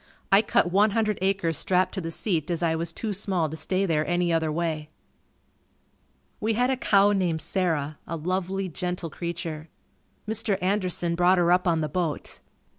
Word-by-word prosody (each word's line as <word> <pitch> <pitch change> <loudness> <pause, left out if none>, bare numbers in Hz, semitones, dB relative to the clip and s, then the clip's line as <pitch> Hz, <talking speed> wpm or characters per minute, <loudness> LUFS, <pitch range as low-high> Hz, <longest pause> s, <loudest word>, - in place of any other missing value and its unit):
I 195 +1 +7
cut 190 -4 +1
one 205 +4 +4
hundred 215 -2 +1
acres 190 -5 +1
strapped 185 0 +1
to 190 - -3
the 165 - -4
seat 165 -2 -1
as 170 -1 -1
I 165 -1 +2
was 165 +1 -2
too 215 +4 -4
small 185 -5 0
to - - -4
stay 185 +4 0
there 155 -4 +1
any 175 -1 +1
other 160 -1 +1
way. 155 -2 -2 1.5
We 220 +1 0
had 250 +4 +2
a - - +2
cow 205 -5 +4
named 180 -5 0
Sarah. 155 -6 -1
A 165 - -3
lovely, 185 +3 -2
gentle 180 -1 -4
creature. 165 -2 -5 0.6
Mr. 220 -2 0
Anderson 185 -3 0
brought 180 +2 +4
her 175 -1 +3
up 180 +1 +3
on 165 -2 +2
the 155 - 0
boat. 165 0 -3
180 Hz, 180 wpm, -26 LUFS, 165-195 Hz, 1.5 s, I